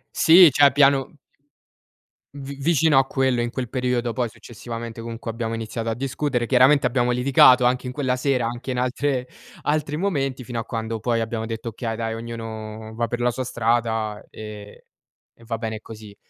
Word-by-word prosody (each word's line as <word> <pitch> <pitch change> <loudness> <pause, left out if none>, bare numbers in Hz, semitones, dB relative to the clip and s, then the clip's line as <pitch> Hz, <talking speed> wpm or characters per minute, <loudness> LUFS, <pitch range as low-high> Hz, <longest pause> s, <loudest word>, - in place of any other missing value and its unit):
Sì 170 0 +8
cioè 140 +1 +5
piano 140 0 +3 1.2
Vi 140 0 -7
vicino 155 +1 +2
a 135 - +5
quello 130 -2 0
in 120 0 -2
quel 130 -3 -4
periodo, 125 -1 -1
poi 120 +1 -1
successivamente, 115 +1 -8
comunque 115 0 -7
abbiamo 115 0 -3
iniziato 115 0 -4
a - - 0
discutere. 130 -1 -2
Chiaramente 130 +2 +5
abbiamo 125 0 +1
litigato 125 0 +5
anche 125 +1 +1
in 125 - -5
quella 130 -3 0
sera, 125 -2 0
anche 120 +2 -5
in 125 - -2
altre 125 0 -1 0.4
altri 150 0 -1
momenti 135 -8 -1
fino 120 -1 -6
a - - -3
quando 115 -1 -4
poi 115 +1 0
abbiamo 110 0 -3
detto: 115 +1 -6
"Okay, 115 0 -4
dai, 115 0 -3
ognuno 110 -1 -7
va 115 - 0
per 120 +2 -4
la 120 0 +2
sua 130 +2 -3
strada 115 -3 -1
e 105 -1 -10 0.5
e 115 - -20
va 115 -1 -4
bene 110 -2 -4
così." 105 -2 -12
120 Hz, 175 wpm, -23 LUFS, 115-130 Hz, 1.2 s, Sì